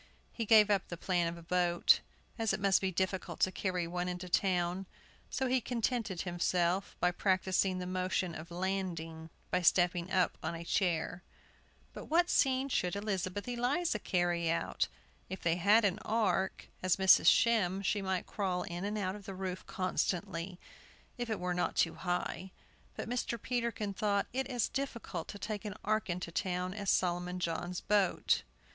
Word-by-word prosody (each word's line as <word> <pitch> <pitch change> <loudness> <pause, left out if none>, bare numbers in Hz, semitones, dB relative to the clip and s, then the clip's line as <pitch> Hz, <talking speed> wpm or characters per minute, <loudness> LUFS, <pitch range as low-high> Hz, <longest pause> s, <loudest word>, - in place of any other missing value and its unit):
He 230 - -3
gave 215 -1 +6
up 195 -3 +1
the 175 - -6
plan 175 -1 +1
of 170 +1 -4
a 170 - -11
boat, 175 0 +3 0.4
as 225 -3 +1
it 195 - -1
must 195 -1 +3
be 190 -1 0
difficult 185 -1 -2
to 185 - +4
carry 180 -3 -1
one 175 +1 -3
into 180 0 -4
town; 180 0 +1 0.4
so 265 - -1
he 255 0 +2
contented 230 -5 -1
himself 175 +1 0
by 180 - +3
practising 185 0 +1
the 180 - -4
motion 185 -1 -1
of 160 +2 -8
landing 170 -3 -3 0.2
by - - +2
stepping 175 0 +3
up 185 -2 +2
on - - -3
a 165 - -6
chair. 175 -1 0 0.7
But - - -8
what 345 +3 +3
scene 265 0 +3
could 180 -9 0
Elizabeth 200 -1 -2
Eliza 245 +3 0
carry 175 -3 0
out? 165 - 0 0.4
If 190 - -5
they 170 0 +2
had 205 +5 +5
an 200 +1 +1
ark, 195 -4 0
as 185 -1 +3
Mrs. 190 -1 +6
Shem 200 -5 +4
she 205 +1 +1
might 190 -1 -1
crawl 185 -3 -2
in 175 +1 -5
and 205 +1 -2
out 190 -2 -1
of 205 -2 -11
the 195 - -6
roof 185 -1 -4
constantly, 180 -1 -2 0.6
if 240 -1 -3
it 220 - -1
were 180 0 -1
not 175 - -1
too 165 - +2
high. 180 +1 -3 0.5
But - - -5
Mr. 240 -1 -2
Peterkin 235 -4 -2
thought 200 0 +1
it 265 0 -1
as 245 -5 0
difficult 235 -11 -4
to 205 - -7
take 210 0 -4
an 210 -2 -5
ark 215 -1 0
into 175 -1 -3
town 180 +1 -1
as 200 -1 -3
Solomon 180 0 +1
John's 175 +1 -2
boat. 205 -3 +2
185 Hz, 175 wpm, -33 LUFS, 175-210 Hz, 0.7 s, gave